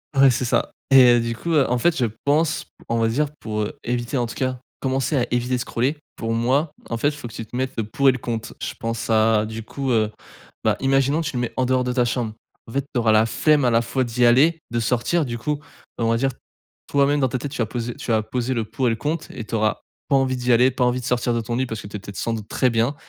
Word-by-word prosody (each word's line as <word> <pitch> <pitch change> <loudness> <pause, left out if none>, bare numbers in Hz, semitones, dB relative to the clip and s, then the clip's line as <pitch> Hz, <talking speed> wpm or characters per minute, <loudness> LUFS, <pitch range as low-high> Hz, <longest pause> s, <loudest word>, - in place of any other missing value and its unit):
Ouais, 135 0 +7
c'est 125 +1 -1
ça 120 - +1 0.2
et 130 -3 +8
heu, - - +3
du 115 0 -2
coup, 170 +8 -4
heu, 145 -4 +3
en 125 - +2
fait 165 +7 +2
je 125 - +2 0.2
pense, 155 +2 +1 0.2
on 115 - 0
va 115 0 +2
dire 145 +6 +1
pour, 105 -1 -2
heu, 105 - -5
éviter, 120 +2 -2
en 120 - +1
tout 115 - -7
cas, 130 -2 -2 0.2
commencer 135 +2 0
à 125 - +2
éviter 120 +1 0
de - - 0
scroller. 125 +5 -1 0.2
Pour 115 - -3
moi 130 +7 +1 0.2
en - - -1
fait, 145 +5 +2
il - - -3
faut 145 - -7
que 115 - -12
tu 115 - -6
te 110 - -31
mettes 130 +1 -1
le 115 - 0
pour 125 +6 0
et - - +9
le - - -3
contre. 115 -2 -5
Je - - -3
pense 115 0 -3
à 110 -1 +3
du 110 +1 -6
coup, 135 +4 -3
heu, 110 -2 +2 0.5
bah, - - +2
imaginons 135 +2 +2
que 160 - -3
tu 145 - -4
le 120 - 0
mets 120 - -3
en 130 - +2
dehors 130 0 +2
de 125 - -1
ta 125 -1 +2
chambre, 115 -2 -2 0.3
en - - -10
fait 140 +3 -1
tu 125 - +1
auras 110 -1 +3
la 110 0 +5
flemme 145 +4 +2
à - - +4
la 115 0 +4
fois 130 +3 -1
d'y 120 +1 +1
aller, 150 +7 +4
de 120 - 0
sortir 125 +8 +1
du 120 -2 -4
coup, 145 +5 -2 0.4
on 115 - 0
va 115 - +3
dire, 135 +3 +1 0.6
toi 140 -1 +3
même 145 +1 +2
dans 130 - +3
ta 130 - -1
tête, 140 +3 -5
tu - - -6
vas - - +2
poser 120 +2 -4
tu - - -4
vas 110 -1 +2
poser 125 +3 -2
le 115 -3 -1
pour 115 +4 -1
et - - +4
le - - 0
contre 150 +7 -3
et - - -6
tu 110 - -4
auras 110 -1 0 0.3
pas 140 - +4
envie 130 -1 +2
d'y 125 0 +2
aller, 125 +3 +5
pas 125 0 +1
envie 125 +1 +1
de - - -8
sortir 125 -1 +1
de 115 - 0
ton 115 +2 -3
lit 130 - +1
parce 110 -3 -5
que - - -9
tu 100 - -6
es - - -9
peut-être 100 0 -10
sans 115 - -1
doute 110 -2 -5
très 130 - +1
bien 120 +4 +1
125 Hz, 300 wpm, -22 LUFS, 115-135 Hz, 0.6 s, et